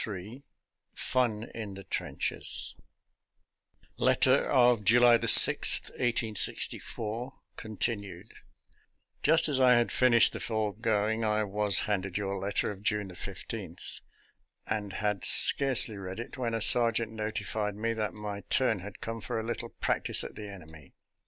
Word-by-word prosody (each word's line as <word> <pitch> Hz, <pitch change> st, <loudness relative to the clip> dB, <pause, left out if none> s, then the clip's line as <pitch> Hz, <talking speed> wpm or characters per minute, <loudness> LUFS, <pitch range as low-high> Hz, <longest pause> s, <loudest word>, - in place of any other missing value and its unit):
XXIII 105 Hz, +5 st, -8 dB, 0.5 s
FUN 120 Hz, -4 st, -1 dB
IN 105 Hz, -4 st, -7 dB
THE 95 Hz, -, -10 dB
TRENCHES -, -, -2 dB, 1.2 s
(Letter -, -, +2 dB
of 120 Hz, -3 st, +3 dB
July 120 Hz, +3 st, +5 dB
6, -, -, +6 dB
1864, 115 Hz, +1 st, -1 dB, 0.2 s
Continued) 110 Hz, -2 st, -6 dB, 0.9 s
Just 165 Hz, 0 st, +3 dB
as 140 Hz, -3 st, -1 dB
I 130 Hz, -1 st, +5 dB
had 120 Hz, 0 st, 0 dB
finished 120 Hz, -3 st, +3 dB
the -, -, -6 dB
foregoing, 110 Hz, 0 st, -2 dB
I 110 Hz, 0 st, 0 dB
was 105 Hz, -1 st, 0 dB
handed 100 Hz, -3 st, -3 dB
your 100 Hz, -1 st, -4 dB
letter 100 Hz, +2 st, -2 dB
of 100 Hz, -1 st, -11 dB
June 105 Hz, -3 st, -2 dB
15, 85 Hz, -, -8 dB, 0.9 s
and 105 Hz, -3 st, -4 dB
had 105 Hz, -2 st, -3 dB
scarcely 130 Hz, -6 st, +6 dB
read 95 Hz, +1 st, -8 dB
it, 120 Hz, -, -8 dB
when 120 Hz, -3 st, -3 dB
a 115 Hz, -, -3 dB
sergeant 115 Hz, 0 st, +3 dB
notified 105 Hz, -1 st, -4 dB
me 115 Hz, +2 st, -3 dB
that 110 Hz, -2 st, -4 dB
my 105 Hz, -1 st, -7 dB
turn 120 Hz, -6 st, 0 dB
had 100 Hz, +3 st, -11 dB
come 115 Hz, 0 st, -6 dB
for -, -, -4 dB
a -, -, -5 dB
little 115 Hz, 0 st, -5 dB
practice -, -, -1 dB
at -, -, -8 dB
the 105 Hz, -1 st, -9 dB
enemy. 80 Hz, -7 st, -14 dB
110 Hz, 135 wpm, -28 LUFS, 100-115 Hz, 1.2 s, 6